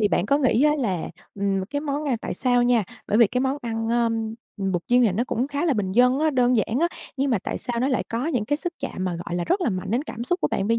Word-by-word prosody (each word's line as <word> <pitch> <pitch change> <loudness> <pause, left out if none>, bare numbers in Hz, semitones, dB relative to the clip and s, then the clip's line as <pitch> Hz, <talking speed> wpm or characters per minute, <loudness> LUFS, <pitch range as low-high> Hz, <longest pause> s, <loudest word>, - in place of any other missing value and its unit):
Thì 210 - +3
bạn 175 +1 +1
có 280 +6 +3
nghĩ 255 -2 +3
á, 300 - +5
là 190 -10 -1 0.3
ừm, 195 -1 0
cái 285 0 -1
món 295 0 -2
ăn 260 -5 +1
tại - - -4
sao 245 +5 +2
nha 240 -3 +3 0.2
bởi 210 - +2
vì 235 - +7
cái 250 +5 -1
món 265 +1 0
ăn, 225 -1 -2
à, 235 -1 +3 0.5
bột 190 -3 -1
chiên 245 +1 +4
này 205 - +3
nó 230 +6 0
cũng 245 +4 -1
khá 285 +3 -2
là 310 -6 +2
bình 190 -3 -1
dân 250 +4 +4
á, 310 0 +2
đơn 250 -2 +3
giản 225 +3 0
á, 340 - +3 0.3
nhưng 275 0 0
mà 230 - +2
tại - - -3
sao 240 -1 -2
nó 260 - +2
lại 260 - 0
có 235 +5 -2
những 250 -10 0
cái 290 - 0
sức 350 +2 -4
chạm 230 -8 -4
mà, 180 - -1
gọi 170 - -3
là, 175 - -1
rất 385 - +1
là 245 - +1
mạnh 185 +1 -4
đến 245 +4 +1
cảm 235 -4 -6
xúc 355 +8 -1
của - - +1
bạn 195 - -1
bây 230 0 +3
245 Hz, 305 wpm, -24 LUFS, 210-275 Hz, 0.5 s, vì